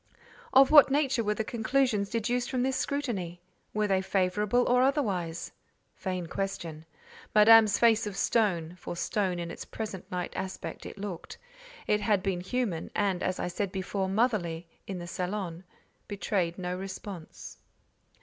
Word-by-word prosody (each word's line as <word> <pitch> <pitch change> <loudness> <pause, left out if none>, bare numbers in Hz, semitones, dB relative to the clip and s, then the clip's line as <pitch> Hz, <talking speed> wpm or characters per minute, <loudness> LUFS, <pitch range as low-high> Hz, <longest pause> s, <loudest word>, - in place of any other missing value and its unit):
Of 270 +2 +6
what 295 -3 +9
nature 270 -4 +2
were 210 0 0
the 220 - -1
conclusions 225 -2 +1
deduced 240 +2 -1
from 255 -2 0
this 265 0 0
scrutiny? 215 -14 -2 0.3
Were 215 0 0
they 190 -1 +2
favourable 200 +5 +1
or 250 0 +4
otherwise? 200 - 0 0.4
Vain 185 -3 -3
question. 170 -4 -4 0.5
Madame's 215 -1 +7
face 225 -2 +4
of 200 -2 -6
stone 180 -8 +1
(for 180 - -6
of - - -9
stone 190 -1 0
in 170 -1 -4
its - - -7
present 200 -4 -6
night 180 -1 -3
aspect 190 0 -5
it - - -10
looked: 195 -4 -6 0.5
it 210 0 +2
had 205 -2 +2
been 190 -3 -1
human, 200 -4 -2
and, 195 -3 +1
as 185 - -1
I - - -1
said 185 +2 -2
before, 190 0 -2
motherly, 190 -7 0 0.2
in 195 - -4
the 175 - -6
salon) 180 0 -4 0.4
betrayed 190 -4 -1
no 180 -1 -3
response. 190 -2 -8
200 Hz, 155 wpm, -29 LUFS, 180-225 Hz, 0.5 s, what